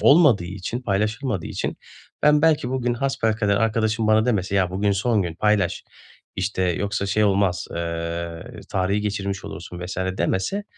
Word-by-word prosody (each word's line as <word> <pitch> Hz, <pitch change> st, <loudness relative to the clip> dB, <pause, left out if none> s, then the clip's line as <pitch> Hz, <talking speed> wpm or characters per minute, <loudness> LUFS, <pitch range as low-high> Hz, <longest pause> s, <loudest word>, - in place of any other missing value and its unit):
Olmadığı 140 Hz, -, +6 dB
için, 95 Hz, +6 st, -5 dB
paylaşılmadığı 105 Hz, -, -1 dB
için -, -, -3 dB, 0.5 s
ben, 150 Hz, 0 st, +5 dB
belki 150 Hz, -6 st, +3 dB
bugün 125 Hz, -2 st, 0 dB
hasbelkader 110 Hz, -6 st, 0 dB
arkadaşım 110 Hz, 0 st, +1 dB
bana 110 Hz, 0 st, +4 dB
demese, 100 Hz, -5 st, 0 dB
"Ya, 90 Hz, -2 st, +2 dB
bugün 100 Hz, +2 st, +1 dB
son 105 Hz, +2 st, +1 dB
gün 85 Hz, -3 st, -4 dB
paylaş, 100 Hz, -2 st, +1 dB, 0.5 s
işte, 95 Hz, 0 st, -1 dB
yoksa 100 Hz, +3 st, -1 dB
şey 105 Hz, +2 st, +2 dB
olmaz, 100 Hz, -3 st, +1 dB
eee, 85 Hz, 0 st, -4 dB
tarihi 95 Hz, +2 st, +1 dB
geçirmiş 100 Hz, -2 st, -3 dB
olursun 85 Hz, +2 st, -8 dB
vs." 90 Hz, -, -6 dB, 0.2 s
demese, 95 Hz, -, 0 dB
100 Hz, 145 wpm, -23 LUFS, 95-115 Hz, 0.5 s, Olmadığı